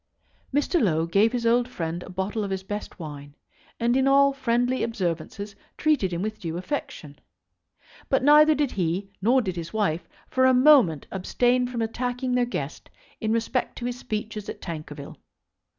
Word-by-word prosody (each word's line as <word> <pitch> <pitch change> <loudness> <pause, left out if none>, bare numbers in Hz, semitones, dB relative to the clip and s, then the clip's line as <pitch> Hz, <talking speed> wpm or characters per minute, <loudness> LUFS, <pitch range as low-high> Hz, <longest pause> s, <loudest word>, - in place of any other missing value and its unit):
Mr. 290 +4 +1
Low 165 -6 +2
gave 200 +6 +3
his 245 -2 -2
old 240 +1 +3
friend 170 -5 -4
a - - -10
bottle 190 +4 -2
of 200 - -3
his 190 0 -3
best 205 +2 -6
wine, 145 -3 -9 0.4
and 240 +1 +2
in 265 0 +3
all 280 0 +5
friendly 245 -1 0
observances 200 -1 -3 0.2
treated 300 -12 +2
him 175 +2 -2
with 215 0 -4
due 165 -1 -4
affection. 175 - -5 0.9
But 270 -1 +2
neither 300 +2 +7
did 290 -3 0
he 185 +2 -2
nor 245 +5 +3
did 185 -4 -3
his 170 +1 -6
wife 195 -6 -1 0.2
for 260 0 +3
a 260 - +5
moment 250 - +5
abstain 245 +6 +1
from 240 -2 -2
attacking 245 +2 -2
their 250 0 +3
guest 145 - -5 0.3
in 220 - -1
respect 230 +2 -1
to 240 - -5
his 245 0 -3
speeches 210 -1 -5
at - - -6
Tankerville. 150 -4 -7
220 Hz, 170 wpm, -25 LUFS, 180-250 Hz, 0.9 s, neither